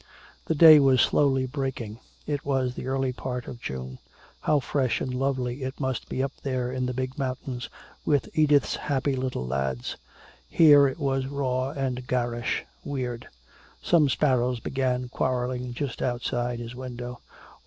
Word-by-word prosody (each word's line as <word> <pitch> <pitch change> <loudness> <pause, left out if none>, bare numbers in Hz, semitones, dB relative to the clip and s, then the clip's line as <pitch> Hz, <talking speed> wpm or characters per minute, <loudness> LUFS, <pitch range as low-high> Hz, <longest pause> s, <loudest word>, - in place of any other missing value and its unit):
The 160 - +1
day 155 0 +10
was 135 -2 +4
slowly 135 -1 +3
breaking. 130 -5 -4 0.3
It 145 -2 -2
was 130 -3 0
the 125 - -6
early 135 -1 0
part 125 -1 -5
of 120 - -8
June. 65 - -6 0.4
How 150 - +2
fresh 130 -2 0
and 130 - -3
lovely 130 -1 -1
it 130 +1 -5
must 130 -3 -2
be 130 - -1
up 135 - -1
there 130 -2 -2
in 130 -1 -1
the 125 - -2
big 130 +2 -3
mountains 130 -1 -4 0.3
with 145 -2 +1
Edith's 150 -4 +3
happy 140 -1 0
little 130 - -2
lads. 65 -1 -2 0.5
Here 145 -3 +7
it 135 - -4
was 135 -3 0
raw 130 -2 -1
and 130 -3 -3
garish, 120 -1 -1 0.2
weird. 125 -4 -4 0.6
Some 155 -5 +4
sparrows 125 -3 +2
began 125 0 -1
quarreling 125 0 -1
just 135 -2 -4
outside 120 -1 -1
his 120 0 -7
window. 125 -1 -7
130 Hz, 155 wpm, -26 LUFS, 125-135 Hz, 0.6 s, day